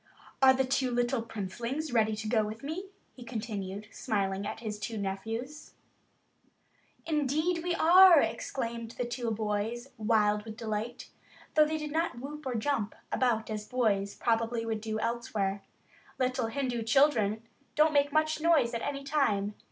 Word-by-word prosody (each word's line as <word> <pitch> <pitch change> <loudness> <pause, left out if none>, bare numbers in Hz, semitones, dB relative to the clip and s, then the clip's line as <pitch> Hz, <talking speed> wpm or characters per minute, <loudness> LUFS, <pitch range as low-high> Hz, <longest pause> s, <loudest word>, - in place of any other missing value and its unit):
"Are 265 -1 +7
the 265 0 +1
two 260 0 +1
little 245 0 0
princelings 235 +7 -4
ready 220 -2 +3
to 215 0 -5
go 220 -1 +2
with 215 +3 -6
me?" 330 +7 -4 0.3
he 250 - -11
continued, 210 -4 -5
smiling 200 -3 -1
at 225 - -6
his 210 -2 -4
two 210 +3 -4
little 210 -2 -3
nephews. 225 +9 -6 1.3
"Indeed 315 +3 0
we 350 -1 0
are," 355 0 +8
exclaimed 230 -4 -3
the 245 - -1
two 240 0 -3
boys, 220 +3 -2
wild 210 -1 +2
with 220 0 -9
delight, 225 +1 -4 0.4
though 305 0 +6
they 315 +1 -1
did 300 -1 -5
not 320 -4 -1
whoop 290 +3 -7
or 250 - -2
jump 225 -2 -1 0.2
about 230 -4 +1
as 210 -1 -4
boys 205 -6 0
probably 230 0 0
would 220 -1 -2
do 220 0 -3
elsewhere. 215 -4 -2 0.6
Little 255 -2 0
Hindu 245 0 -2
children 225 -4 +3 0.3
don't 305 +1 +4
make 285 0 +3
much 310 +1 +1
noise 305 -8 +3
at 230 - -2
any 275 -1 -3
time. 215 -9 +1
235 Hz, 160 wpm, -30 LUFS, 215-280 Hz, 1.3 s, are